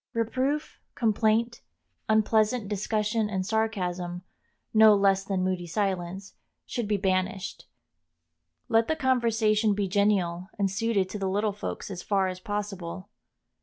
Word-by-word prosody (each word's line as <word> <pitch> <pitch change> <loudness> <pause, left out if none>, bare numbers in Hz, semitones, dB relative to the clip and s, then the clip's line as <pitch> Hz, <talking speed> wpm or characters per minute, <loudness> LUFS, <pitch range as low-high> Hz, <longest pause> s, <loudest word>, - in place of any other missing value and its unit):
Reproof, 260 +6 -1 0.2
complaint, 225 +1 +1 0.5
unpleasant 220 +1 +2
discussion, 210 +1 -1
and 190 -2 -2
sarcasm, 185 -5 -2 0.5
no 220 -1 +7
less 195 -1 +3
than 195 -2 -1
moody 185 -2 -1
silence, 190 0 -2 0.3
should 240 -4 -3
be 210 0 +1
banished. 185 -1 -2 1.0
Let 225 0 +3
the 315 - +1
conversation 225 -5 +2
be 200 -1 0
genial 185 -3 +1
and 195 -2 +1
suited 205 -2 0
to 210 - -5
the 195 -1 -1
little 205 +2 0
folks 205 0 -6
as 180 -2 -5
far 195 -1 +1
as 185 0 -6
possible. 195 -2 -5
205 Hz, 130 wpm, -27 LUFS, 190-220 Hz, 1.0 s, no